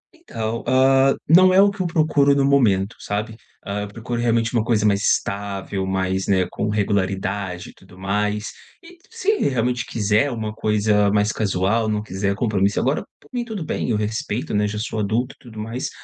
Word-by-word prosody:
Então, 115 - -5
hã, 135 +1 +4
não 185 +4 +7
é 190 - +5
o 200 0 +5
que 200 -1 -6
eu 180 - 0
procuro 155 -4 +3
no 140 -1 +2
momento, 115 -7 +2
sabe, 105 +2 -4 0.3
ah, 100 +1 -3
eu 105 - -4
procuro 115 +3 -5
realmente 115 0 +1
uma 115 -3 +2
coisa 110 -3 +1
mais 100 -1 +2
estável, 100 -2 -1
mais 95 0 -1
né, 95 -2 +2
com 105 - -2
regularidade 100 -2 -2
e - - -25
tudo 95 -1 -19
mais. 105 +2 -2 0.3
E - - -14
ele 355 - -17
se 445 -2 0
realmente 125 -1 -1
quiser 110 +5 +1
uma 110 -3 -4
coisa 105 -1 +2
mais 105 +1 +2
casual, 105 +2 0
não 105 -1 -1
quiser 100 0 -2
compromisso 100 -2 +1
agora, 135 +4 0 0.2
por - - -23
mim, 245 -1 -1
tudo 215 -8 -6
bem, - - -2
eu 110 - +1
respeito, 105 +1 -3
né 105 0 +2
já 105 +1 -4
sou 110 +1 -3
adulto 115 +5 -1
e - - -27
tudo 110 -3 -10
mais. 115 +4 -4
110 Hz, 195 wpm, -21 LUFS, 100-125 Hz, 0.3 s, não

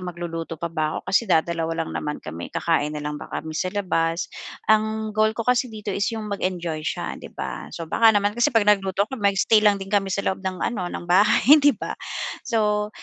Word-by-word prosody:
magluluto 165 -1 -5
pa 170 +1 -5
ba 155 -1 -1
ako. - - -6
Kasi 220 +1 +3
dadalawa 165 -1 +1
lang - - -8
naman 150 0 -3
kami. 85 +2 -6
Kakain 150 -2 0
na 150 - -5
lang 150 0 -4
kami 160 0 -6
sa 185 +4 -1
labas? 165 -3 0 0.5
Ang 220 0 0
goal 215 +1 +2
ko 230 - -2
kasi 250 +1 +2
dito 210 -2 -5
is 200 +2 0
yung 215 -2 -5
mag-enjoy 175 -5 -2
siya, - - -4
'di - - -9
ba? - - -5
So, 165 - -5
baka 225 +8 +4
naman 205 0 +2
kasi 240 +2 +2
'pag 225 -4 +2
nagluto 195 -1 +2
ako 240 +1 -8
mag-stay 200 +2 +4
lang 210 -1 +4
din 195 +1 -8
kami 195 -1 +2
sa 200 +1 -2
loob 190 - -1
ng 185 -2 -3
ano 195 -7 -2
ng - - -6
bahay, 215 - +5
'di 285 -5 +4
ba? - - -4 0.5
So, 210 -2 0
195 Hz, 210 wpm, -23 LUFS, 165-215 Hz, 0.5 s, bahay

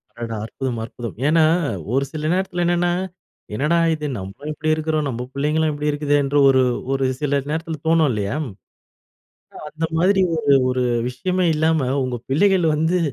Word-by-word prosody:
அடடா! 115 -1 -5
அற்புதம், 125 0 -4
அற்புதம். 115 0 -7
ஏன்னா, 160 +1 +4 0.5
ஒரு 135 +1 +2
சில 155 0 -3
நேரத்தில 185 -1 -1
என்னன்னா, 175 0 +2 0.6
என்னடா 150 +8 +1 0.2
இது 155 -1 -4
நம்பளும் 100 +11 -7
இப்படி 155 +1 -1
இருக்கறோம். 155 -1 -1
நம்ப 125 -2 -4
புள்ளைங்களும் 150 +3 +1
இப்படி 150 +1 -2
இருக்குதேன்ற 145 -1 +1
ஒரு, 130 -1 +5 0.3
ஒரு 135 0 +1
சில 145 -1 +1
நேரத்தில 160 0 -3
தோணும் 160 -3 +4
இல்லையா? 105 +2 -2 1.2
அ - - -9
அந்த 160 +2 -3
மாதிரி 190 +3 +3 0.2
ஒரு, 145 -2 +3 0.2
ஒரு 125 0 0 0.3
விஷயமே 180 +8 -1
இல்லாம 155 -3 +1 0.2
உங்க 125 -1 -3
பிள்ளைகள் 185 +5 +3
வந்து, 160 +4 +1
150 Hz, 150 wpm, -21 LUFS, 135-160 Hz, 1.2 s, ஒரு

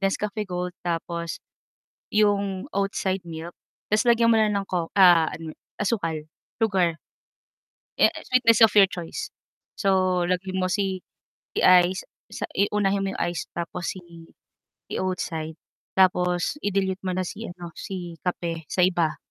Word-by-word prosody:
Nescafe 205 +1 -1
Gold 180 0 -3
tapos 170 -1 -3 0.8
yung 200 -2 +2
Oatside 195 -1 -1
milk 165 +1 -7 0.4
ta's 215 0 +3
lagyan 235 -1 +5
mo - - +4
ng 205 -2 +1
co 175 -3 -2
ah, 175 -4 +7 0.5
asukal, 195 -7 -1 0.4
sugar 185 -7 +2 1.0
eh, - - +7 0.2
sweetness 240 -3 +4
of 220 - +4
your 200 -1 +9
choice. 175 -4 -5 0.5
So, 185 -3 +2
lagyan 185 +1 -1
mo 185 - +1
si 195 -2 -1 0.6
ice 185 0 +5 0.3
sa - - -5
i 200 - +4
unahin 200 -1 +1
mo - - -1
yung - - -8
ice 175 -1 -2
tapos 170 +1 -3
si 185 - -9 1.0
Oatside 165 -4 -3 0.4
tapos 180 +3 +2
i-dilute 195 -1 0
mo 185 - -1
na 185 - 0
si 220 - -7
ano 175 -1 -9
si 175 -3 -6
kape 170 -2 -3
sa - - 0
iba, 175 -4 +1
185 Hz, 135 wpm, -25 LUFS, 175-200 Hz, 1.0 s, your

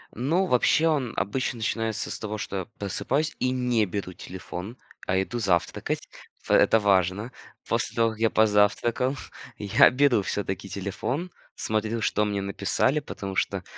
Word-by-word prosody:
Ну, 160 - +1
вообще, 155 +2 +3
он 140 -7 0
обычно 130 +4 -1
начинается 110 -1 -2
с - - -5
того, 110 0 -4
что 100 -1 -5
я 95 - -3
просыпаюсь 140 +10 -1
и 125 - +1
не 125 -3 +1
беру 90 -1 -4
телефон, 95 +5 -8 0.3
а 95 - +2
иду 120 +5 -3
завтракать. 90 -6 0 0.4
В - - -5
это 110 - +5
важно. 100 +2 +2 0.4
После 115 0 -1
того 115 -1 +3
как 110 - -11
я 115 0 +3
позавтракал, 110 +5 +2 0.4
я 100 -1 +5
беру 125 -3 +3
всё-таки 95 0 -3
телефон, 120 - -3 0.2
смотрю, 110 +1 -1
что 105 0 +1
мне 100 -1 -1
написали, 100 +8 +1
потому 100 -9 -6
что - - -1
110 Hz, 150 wpm, -26 LUFS, 100-125 Hz, 0.4 s, это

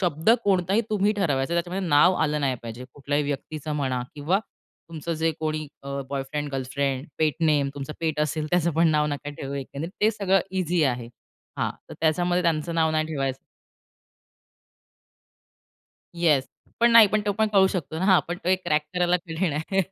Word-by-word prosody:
शब्द 170 +1 +2
कोणताही 195 +1 +2
तुम्ही 210 0 +2
ठरवायचं, 165 -7 0
त्याच्यामध्ये 175 +2 -2
नाव 150 +5 +5
आलं 150 -1 0
नाही 135 -2 +1
पाहिजे. 115 +2 -7
कुठल्याही 145 +1 -1
व्यक्तीचं 150 +2 -4
म्हणा, 130 -3 -1
किंवा 155 +7 +1 0.5
तुमचं 165 +1 -4
जे 160 +1 +1
कोणी 155 -1 -2 0.2
अ, 140 0 -4
बॉयफ्रेंड, 140 +2 -3
गर्लफ्रेंड, 135 +1 -2
पेट 155 -2 +2
नेम, 150 -3 +3
तुमचं 140 +1 -6
पेट 160 -2 -1
असेल, 155 0 -1
त्याचं 175 -1 +2
पण 165 +1 +4
नाव 150 -1 +2
नका 145 0 -4
ठेवू, 140 -1 -6
एकंदरीत 140 +4 -5
ते 215 - +4
सगळं 195 -3 +2 0.2
ईझी 175 -1 +1
आहे. 120 -3 -1 0.5
हां, - - 0 0.2
तर - - -9
त्याच्यामध्ये 175 +3 +2
त्यांचं 165 0 0
नाव 160 -1 +2
नाही 155 0 0
ठेवायचं 135 -4 -2 2.8
येस, 155 -6 +2 0.3
पण 235 0 +5
नाही. 230 -2 +9
पण 215 +1 +1
तो 205 - +2
पण 220 +1 +1
कळू 195 -2 +6
शकतो 165 -4 -3
ना. 185 - -1
हां, 190 -2 +6
पण 175 +1 -3
तो 180 - 0
एक 185 0 +2
क्रॅक 150 0 +2
करायला 180 0 +3
कठीण 170 -1 -2
आहे. 160 +6 0
155 Hz, 175 wpm, -25 LUFS, 145-180 Hz, 2.8 s, नाही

